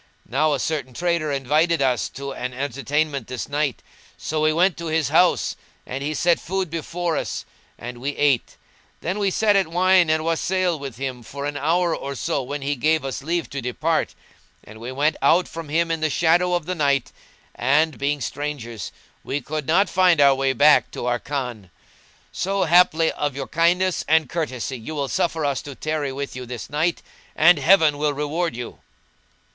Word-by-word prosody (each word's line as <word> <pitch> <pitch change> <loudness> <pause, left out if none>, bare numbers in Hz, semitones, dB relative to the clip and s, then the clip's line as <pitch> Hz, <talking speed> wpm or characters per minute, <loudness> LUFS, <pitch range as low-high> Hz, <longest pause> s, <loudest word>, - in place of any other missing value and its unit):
Now 150 +5 +1
a 140 - -1
certain 135 -4 -3
trader 170 -2 0
invited 150 +5 +1
us 130 -3 +1
to 140 0 -6
an 125 -1 -5
entertainment 140 0 -2
this 130 -1 -5
night; 145 -3 -2 0.3
so 155 0 -3
we 155 0 +3
went 175 +3 +3
to 170 - -5
his 160 -3 0
house 175 +4 +3 0.3
and 135 +2 -5
he 155 +2 -2
set 170 +1 +2
food 190 -2 -3
before 170 +1 -2
us - - -3 0.3
and 120 0 -8
we 140 +3 -3
ate: 140 -5 +1 0.4
then 185 +5 -2
we 200 -1 +2
sat 210 +2 +2
at 195 -3 +3
wine 180 0 +4
and 155 0 +1
wassail 175 0 0
with 135 -4 -7
him 130 -2 -4
for 140 +5 -7
an 145 0 -3
hour 165 +4 +1
or 140 0 -5
so 140 - -1
when 140 +2 -5
he 145 +1 -1
gave 155 +2 +1
us 135 -1 -4
leave 165 -1 -1
to 140 - -4
depart; 155 +7 -1 0.5
and 110 +1 -13
we 120 +3 -6
went 145 +4 +1
out 180 +2 +4
from 165 -2 -8
him 165 +2 +1
in 165 - -1
the 155 - +1
shadow 175 +4 +2
of 175 -3 -2
the 185 - -2
night 140 -5 +1 0.4
and, 150 +5 +1
being 145 +1 -1
strangers, 130 -4 -5 0.3
we 140 - -2
could 150 +1 -5
not 185 +6 +4
find 180 -3 +3
our 140 -1 +7
way 135 0 +1
back 145 +4 +5
to - - -6
our 120 0 0
Khan. 125 -9 -5 0.6
So 195 +1 -1
haply 165 -2 +4
of 145 -2 -3
your 135 -1 -4
kindness 175 +3 +2
and 160 -1 +3
courtesy 130 -5 -3
you 155 +8 -7
will 140 -2 -2
suffer 160 +5 0
us 140 -2 0
to 140 -2 -9
tarry 155 -2 -2
with 140 0 -5
you 125 -1 -7
this 120 -1 -7
night, 160 +3 0 0.3
and 165 0 +6
Heaven 155 -2 +4
will 150 -1 +1
reward 150 +1 -2
you!" 120 0 -7
150 Hz, 190 wpm, -22 LUFS, 135-165 Hz, 0.6 s, our